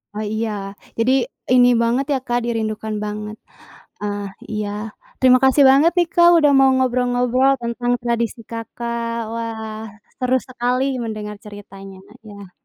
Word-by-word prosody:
Oh 215 0 -3
iya. 220 0 -1 0.5
Jadi 230 +3 +2 0.4
ini 245 -1 +6
banget 240 +4 +1
ya, - - +2
Kak, 240 -1 0
dirindukan 220 -2 -3
banget. 210 0 -5 0.7
Ah, 205 0 -3 0.3
iya. 210 -1 -3 0.5
Terima 255 -1 +6
kasih 265 +2 +5
banget 290 +5 +5
nih, 345 - +3
Kak, 345 0 +6
udah 295 -2 +4
mau 270 0 +6
ngobrol-ngobrol 250 +1 +2
tentang 240 +1 -2
tradisi 235 -1 -2
Kakak. 230 0 -4
Wah, 220 -1 -5 0.4
seru 255 0 +1
sekali 250 +1 -1 0.2
mendengar 210 -2 -5
ceritanya. 195 -2 -11 0.3
Iya. 200 -3 -12
235 Hz, 135 wpm, -20 LUFS, 215-255 Hz, 0.7 s, ini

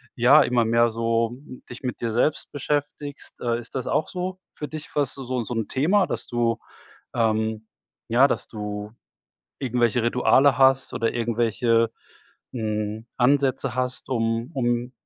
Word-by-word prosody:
ja, 135 +5 +6
immer 120 -2 +2
mehr 115 +1 +4
so, 115 0 +1
hm, 130 0 -12
dich 120 - -9
mit 125 -2 -3
dir 115 -1 -1
selbst 135 +6 0
beschäftigst. 145 0 -4
Äh, 120 -1 0
ist 115 - -12
das 130 -2 -3
auch 155 - +1
so 185 +1 -4 0.2
für 150 - -5
dich, 155 +2 -8
was 145 -2 0
du 135 - -7
so 125 0 -2
so 120 - -5
‘n 115 -2 -1
Thema, 185 +9 +2
dass - - -4
du, 120 -1 0 0.6
ähm, 110 -1 0 0.4
ja 125 +4 +6
dass - - -2
du 105 -1 -6 0.7
irgendwelche 120 -2 +1
Rituale 125 +3 +4
hast 135 0 +4
oder 115 - 0
irgendwelche, 115 0 +1 0.6
hm, 110 -1 -3
Ansätze 135 -1 +2
hast, 125 0 -2
um 115 0 0
um 120 -1 0
120 Hz, 155 wpm, -24 LUFS, 115-135 Hz, 0.7 s, ja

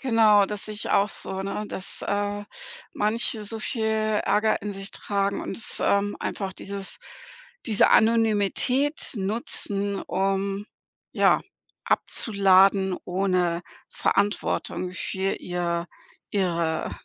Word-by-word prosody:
Genau, 220 -5 +5
das 205 0 -5
sehe 215 - -6
ich 210 - -4
auch 200 +1 +4
so, 190 -1 -5
ne, 200 +2 -3
dass, 190 - -7
äh, 205 0 -1 0.5
manche 215 +1 0
so 225 +2 -5
viel 220 0 -2 0.4
Ärger 210 +1 +2
in 205 - -3
sich 195 0 -8
tragen 200 -1 -1
und - - -5
es, 230 - -3
ähm, 200 0 +1
einfach 195 -2 -3
dieses 195 - -6 0.7
diese 215 -4 +4
Anonymität 225 +6 +2
nutzen, 200 -1 -1
um, 195 +1 -1 0.5
ja, - - +4 0.4
abzuladen 195 -2 +4
ohne 180 -2 0 0.3
Verantwortung 200 -2 -1
für 190 +1 -1
ihr 175 -1 -2 0.4
ihre 170 -5 0
200 Hz, 115 wpm, -25 LUFS, 190-210 Hz, 0.7 s, Genau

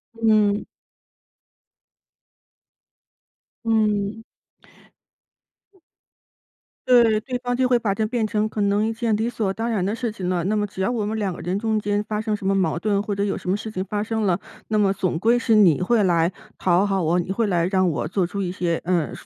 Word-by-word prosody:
嗯。 215 -2 +2 3.0
嗯。 215 -1 0 2.6
对！ 235 -4 +5
对 250 +3 -4
方 245 0 -2
就 255 +1 +2
会 250 -1 +4
把 210 -4 -1
它 215 +2 -1
变 230 0 -1
成 215 0 0
可 215 -1 -4
能 205 +2 +2
一 225 - -2
件 225 -1 -1
理 225 +2 -1
所 215 -5 -2
当 225 +4 -3
然 205 -6 0
的 205 - -1
事 235 0 -2
情 190 -4 -4
了。 175 -2 -1
那 210 +3 +1
么 210 -1 +1
只 200 - -11
要 190 - +1
我 230 -4 -1
们 220 +1 -2
两 195 -3 -1
个 - - -9
人 185 +3 -2
中 220 -1 0
间 205 0 0
发 210 0 -2
生 215 0 -2
什 205 -2 -3
么 195 - +2
矛 170 -4 0
盾 205 +1 0
或 205 - -3
者 200 0 -1
有 200 - -2
什 185 -2 -6
么 195 - +2
事 220 - -6
情 185 -3 -3
发 205 +2 -3
生 220 +1 -2
了， 185 -2 +1 0.3
那 215 - +1
么 200 -2 +3
总 185 -4 -2
归 230 +5 +3
是 230 -1 +1
你 185 -6 +5
会 225 +4 +2
来 170 -1 +2 0.3
讨 180 +2 +2
好 195 -2 0
我， 170 +3 +2
你 175 - -4
会 220 +4 0
来 175 -3 +1
让 185 -1 +2
我 155 - -2
做 185 +2 0
出 200 +3 -4
一 180 - -2
些， 170 -3 -1
呃 175 -3 0
205 Hz, 220 characters per minute, -23 LUFS, 185-220 Hz, 3.0 s, 对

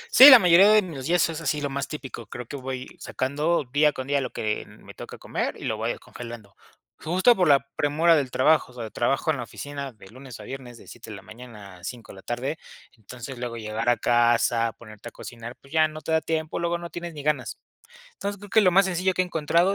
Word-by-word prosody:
Sí, 270 +3 +12
la 260 - +12
mayoría 180 +1 +6
de 215 -1 +5
mis 145 -6 -7
días 175 -1 +3
es 165 0 -5
así, 150 -1 -1
lo 145 -1 -3
más 140 0 -3
típico. 135 -7 -8
Creo 120 +2 -8
que 140 - -8
voy 130 -1 -5
sacando 150 +5 -1
día 150 +1 +4
con 130 - -6
día 140 0 0
lo 130 - -3
que 105 -1 -3
me - - -15
toca - - -10
comer - - -3
y - - -11
lo 110 - -1
voy 110 +2 -3
descongelando. 115 -6 -9 0.4
Justo 185 +9 +3
por 180 - +2
la 140 -2 +4
premura 160 +3 +3
del 140 -4 0
trabajo. 130 0 +2
O - - -20
sea, 115 -3 -7
trabajo 135 +6 0
en 140 - -2
la 120 - -4
oficina 140 +2 -7
de 105 -5 -16
lunes 130 -2 -11
a - - -9
viernes 125 -1 -9
de - - -16
7 115 -1 -12
de 105 - -7
la 100 - -12
mañana 110 -5 -12
a 90 - -20
5 120 -3 -8
de 95 - -13
la - - -12
tarde. 130 +8 -4 0.4
Entonces, 120 +3 -10
luego 120 -1 -5
llegar 110 +2 -2
a 120 - +3
casa, 120 -1 +2
ponerte 110 0 -12
a - - -25
cocinar, 120 0 -9
pues 140 +3 -17
ya 155 -1 +4
no 155 0 -9
te 160 - -5
da 160 0 +3
tiempo, 160 0 -3
luego 170 0 -1
no 170 -1 -9
tienes 170 0 -7
ni 145 - -7
ganas. 150 -4 -1 0.6
Entonces, 200 - -5
creo 205 +1 -12
que 220 +1 +4
lo 185 - +5
más 190 +2 +4
sencillo 185 +1 0
que 185 - -1
he 180 - +1
encontrado 170 +4 +1
140 Hz, 245 wpm, -25 LUFS, 120-165 Hz, 0.6 s, Sí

